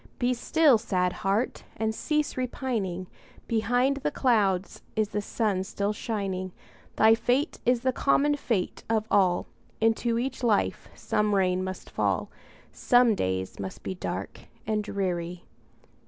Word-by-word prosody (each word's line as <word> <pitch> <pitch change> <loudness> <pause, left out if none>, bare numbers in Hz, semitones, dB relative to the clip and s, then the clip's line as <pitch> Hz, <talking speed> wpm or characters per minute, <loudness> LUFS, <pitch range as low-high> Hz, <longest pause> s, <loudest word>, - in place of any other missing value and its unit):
Be 245 0 +1
still, 280 0 +4
sad 180 -5 0
heart! 200 +6 -1
and 220 0 0
cease 300 +5 -1
repining; 235 -8 -2 0.4
Behind 245 +5 +1
the 275 - -1
clouds 205 -7 +1
is 215 -2 +1
the 210 - -2
sun 205 -3 -1
still 200 +2 -2
shining; 195 -4 -3 0.4
Thy 220 +1 +6
fate 250 +7 0
is 245 -1 +3
the 260 0 +1
common 290 +2 +3
fate 225 -9 -2
of 220 -1 +1
all, 185 -3 +3 0.3
Into 225 +1 +2
each 260 +2 -2
life 225 -4 +1
some 210 -1 0
rain 185 -1 +2
must 185 0 -6
fall, - - -1 0.4
Some 245 -2 +4
days 95 - -2
must 95 -1 -6
be - - -3
dark 185 - -5 0.3
and 215 -1 0
dreary. 180 -3 -3
215 Hz, 140 wpm, -27 LUFS, 190-245 Hz, 0.4 s, Thy